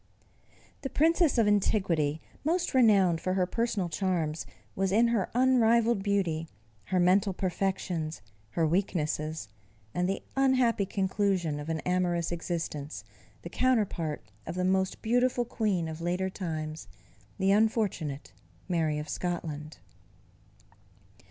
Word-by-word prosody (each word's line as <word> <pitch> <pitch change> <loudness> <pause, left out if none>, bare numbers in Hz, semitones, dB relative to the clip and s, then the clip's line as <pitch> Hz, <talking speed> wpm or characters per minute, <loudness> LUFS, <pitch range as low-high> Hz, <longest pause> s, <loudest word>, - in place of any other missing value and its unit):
_ - - -35
The 270 - -3
Princess 325 0 +3
of 225 -2 +4
antiquity, 175 -7 +1 0.2
most 345 +4 0
renowned 200 -9 +4
for 185 0 -1
her 185 -1 +2
personal 215 -2 -1
charms, 165 -2 -1 0.3
was 195 0 0
in 230 +4 +4
her 220 -6 0
unrivalled 235 -3 +4
beauty, 185 -6 0 0.4
her 185 - 0
mental 190 +3 +3
perfections, 180 - -2 0.3
her 165 - +2
weaknesses, 155 - -1 0.5
and 180 +1 0
the 195 - -2
unhappy 255 -6 +3
conclusion 190 -5 0
of 145 +2 -6
an 160 -1 -1
amorous 175 -2 0
existence 160 - -4 0.4
the 170 - -6
counterpart 210 - 0 0.2
of - - -4
the 180 0 0
most 190 0 0
beautiful 245 +1 +2
queen 210 -8 -1
of 160 +1 -6
later 180 +2 -1
times, 155 - -5 0.5
the 190 +1 +2
unfortunate 200 - 0 0.3
Mary 160 -4 0
of 150 0 -4
Scotland. 155 -4 -4
185 Hz, 125 wpm, -29 LUFS, 165-215 Hz, 0.5 s, of